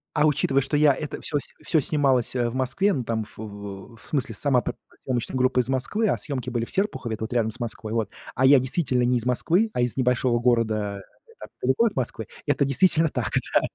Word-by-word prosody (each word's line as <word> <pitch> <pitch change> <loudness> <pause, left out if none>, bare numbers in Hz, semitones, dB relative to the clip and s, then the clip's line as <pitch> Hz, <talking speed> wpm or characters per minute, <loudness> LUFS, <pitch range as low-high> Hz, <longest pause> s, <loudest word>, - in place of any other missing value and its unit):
А 150 0 +4
учитывая, 140 -2 +2
что 135 +3 -2
я 145 -2 +5
это 150 +2 -6
всё 150 - -1
с - - -8 0.2
всё 160 - +3
снималось, 135 -4 +2
э, 120 -1 +1
в 115 - -7
Москве, 130 +11 +1
ну, 130 - -2
там, 115 -1 -2
ф 105 - -15
в 100 +1 -8
в - - -17
смысле 130 -7 -1
сама 135 -1 +2
п - - -3 0.3
съёмочная 130 0 -2
группа 130 0 +2
из 125 - -5
Москвы, 210 - 0
а - - +1
съёмки 130 -4 -4
были 120 -1 -2
в - - -12
Серпухове, 190 - -1
это 110 - -6
вот 110 - -4
рядом 115 -2 +1
с 130 - -9
Москвой, 115 -2 -5
вот, 110 -3 -1 0.3
а 130 - +2
я 135 0 +7
действительно 130 -2 +1
не 125 0 +2
из 120 - -4
Москвы, 170 - +2
а 125 - 0
из 120 -1 0
небольшого 125 -1 +2
города 110 -4 0 0.3
не 460 - -19
так - - -9
далеко 235 - +2
от 220 - 0
Москвы, 115 -4 -3 0.2
это 145 -1 +2
действительно 160 +3 +3
так, - - -3 0.2
да. - - +5
125 Hz, 235 wpm, -24 LUFS, 115-145 Hz, 0.3 s, я